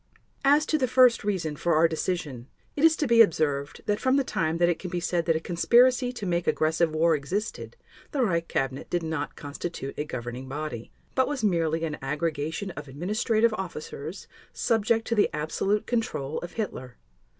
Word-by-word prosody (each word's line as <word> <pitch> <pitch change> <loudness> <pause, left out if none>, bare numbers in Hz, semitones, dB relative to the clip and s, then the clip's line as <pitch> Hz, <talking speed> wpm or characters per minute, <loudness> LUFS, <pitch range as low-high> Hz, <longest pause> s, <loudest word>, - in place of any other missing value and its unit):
As 290 +2 +5
to 310 - +1
the 255 - +2
first 250 -2 +5
reason 185 -7 -1
for 170 +2 +1
our 160 +2 +5
decision, 160 -6 -3 0.3
it 290 - -2
is 325 -1 +6
to 305 - -1
be 235 -3 +6
observed 145 -7 +1
that 205 0 0
from 260 +1 +2
the 275 - +3
time 165 -9 -1
that 175 0 +3
it 175 -2 0
can 185 - -6
be 175 0 -2
said 175 0 -1
that 165 - +3
a - - +1
conspiracy 245 +9 +3
to 240 -5 -6
make 175 -1 -1
aggressive 160 +1 +2
war 165 +1 +4
existed 190 - -3 0.3
the 275 -4 0
Reich 170 -6 0
Cabinet 135 0 -2
did 175 -1 -1
not 160 -2 -3
constitute 145 -1 -6
a - - +1
governing 125 -1 -6
body, 140 -5 -5 0.2
but 260 - +2
was 285 -5 -3
merely 165 -5 +1
an 150 -2 -4
aggregation 155 +5 -2
of 150 -3 -8
administrative 215 - +1
officers 165 -1 -6 0.2
subject 225 0 +1
to - - -1
the 210 -2 +3
absolute 195 +7 -1
control 225 - -2
of 175 0 -8
Hitler. 130 - -5
170 Hz, 185 wpm, -27 LUFS, 150-225 Hz, 0.3 s, is